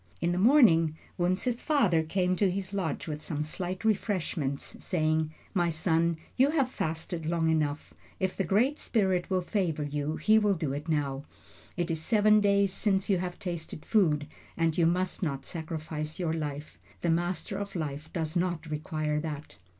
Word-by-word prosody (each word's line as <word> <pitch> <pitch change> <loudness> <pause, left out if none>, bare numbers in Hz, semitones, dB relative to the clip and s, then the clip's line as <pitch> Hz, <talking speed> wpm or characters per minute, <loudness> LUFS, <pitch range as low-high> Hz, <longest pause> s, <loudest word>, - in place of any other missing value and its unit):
In 170 - +1
the 175 - 0
morning, 185 - +5 0.2
Wunzh's 185 +8 0
father 210 - +3
came 180 +3 0
to 200 0 +3
his 190 +1 -3
lodge 180 -6 -2
with 150 -1 -4
some 150 -2 -2
slight 180 +5 -4
refreshments, 175 -10 -1
saying: 155 -2 +1 0.2
"My 175 -4 +2
son, 165 0 +1 0.2
you 265 +3 +4
have 275 -5 +1
fasted 160 -2 -3
long 165 -1 +2
enough. 150 -2 -1 0.3
If 190 -1 -1
the 195 - 0
Great 230 - +2
Spirit 190 -5 +1
will 185 -1 +1
favor 175 -5 -1
you, 145 +1 -2
he 220 +5 +4
will 205 -2 +2
do 155 -5 -2
it 150 +4 -5
now. 145 -2 -1 0.5
It 175 -1 0
is 160 -1 -2
seven 215 +3 +4
days 200 -1 +3
since 195 -1 +1
you 190 - +3
have 180 0 -4
tasted 170 -4 -5
food, 155 -9 +3 0.3
and 165 -1 +2
you 170 -2 +4
must 180 +2 0
not 140 -6 -2
sacrifice 155 -2 -5
your 170 -3 -1
life. 150 -2 -5 0.2
The 170 - +2
Master 175 +4 -1
of 200 -1 -5
Life 155 -1 -4
does 160 -3 -3
not 175 -2 0
require 155 -1 -1
that." 150 -2 -6
170 Hz, 175 wpm, -29 LUFS, 155-195 Hz, 0.5 s, morning